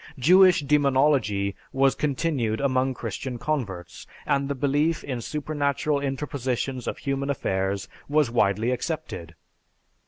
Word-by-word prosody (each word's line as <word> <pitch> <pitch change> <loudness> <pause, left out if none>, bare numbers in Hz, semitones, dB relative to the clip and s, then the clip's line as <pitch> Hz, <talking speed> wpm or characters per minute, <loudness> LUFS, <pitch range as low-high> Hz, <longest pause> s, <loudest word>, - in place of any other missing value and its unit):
Jewish 180 +5 +6
demonology 135 -8 +2 0.2
was 135 0 +3
continued 140 -6 -1
among 130 -1 +1
Christian 120 +3 -5
converts, 120 -10 -4 0.2
and 140 0 +1
the 140 - -1
belief 145 +4 +1
in 125 -4 -4
supernatural 145 +1 -1
interpositions 135 -2 -3
in - - -2
human 140 0 -3
affairs 95 -6 -1 0.2
was 145 -4 +2
widely 110 +1 +2
accepted. 125 - -4
135 Hz, 115 wpm, -25 LUFS, 120-145 Hz, 0.2 s, Jewish